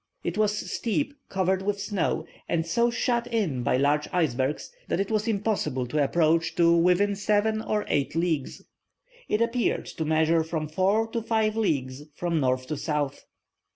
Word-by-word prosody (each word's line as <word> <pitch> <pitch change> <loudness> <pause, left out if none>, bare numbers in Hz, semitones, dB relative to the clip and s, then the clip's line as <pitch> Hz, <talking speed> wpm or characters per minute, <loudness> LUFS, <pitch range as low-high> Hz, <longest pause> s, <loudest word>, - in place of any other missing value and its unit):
It 170 - -2
was 210 0 0
steep, 280 +5 -1 0.2
covered 190 0 +1
with 200 +1 -1
snow, 200 -3 -1 0.2
and 165 -1 0
so 235 +8 +2
shut 240 0 0
in 200 - -1
by 125 - +1
large 145 +2 +2
icebergs, 150 -5 0 0.2
that - - -1
it 195 +2 -1
was 215 +1 0
impossible 205 - 0
to 145 +4 0
approach 165 +2 +2
to 170 0 +5
within 180 +4 +3
seven 210 +2 +1
or 210 -1 -1
eight 145 0 0
leagues. 165 -5 -1 0.7
It 210 - +1
appeared 235 +1 0
to 160 - -5
measure 160 +1 +2
from 160 -1 -3
four 195 +7 +2
to 230 +1 -2
five 220 -1 +1
leagues 140 - -1
from 170 -2 -1
north 130 -2 0
to 155 - -2
south. 150 -3 -2
180 Hz, 165 wpm, -26 LUFS, 155-215 Hz, 0.7 s, to